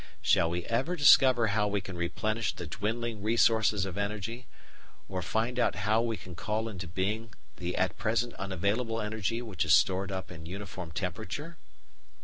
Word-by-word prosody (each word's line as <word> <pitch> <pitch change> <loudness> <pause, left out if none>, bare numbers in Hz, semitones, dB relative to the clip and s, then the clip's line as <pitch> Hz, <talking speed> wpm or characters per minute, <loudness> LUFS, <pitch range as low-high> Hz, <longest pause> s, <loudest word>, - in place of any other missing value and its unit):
Shall 80 - +4
we 85 +1 -3
ever 130 +10 0
discover 130 -6 +6
how 105 -1 +2
we 100 0 0
can 95 -1 -8
replenish 105 +6 -1
the 90 - -6
dwindling 110 +6 -3
resources 110 -2 +3
of 95 0 -5
energy, 105 +4 -3 0.6
or 95 -1 -3
find 115 +7 -1
out - - +2
how 110 +2 +2
we 115 -2 -1
can 90 - -10
call 110 +6 -2
into 95 -5 -6
being 105 +5 -2 0.2
the 90 0 -3
at 95 0 0
present 115 +2 0
unavailable 100 +5 -1
energy 110 +2 -2
which 95 -8 -2
is - - +6
stored 95 +1 +2
up 95 -1 -5
in 80 -2 -9
uniform 95 -2 -6
temperature? 95 - -4
105 Hz, 165 wpm, -30 LUFS, 95-115 Hz, 0.6 s, discover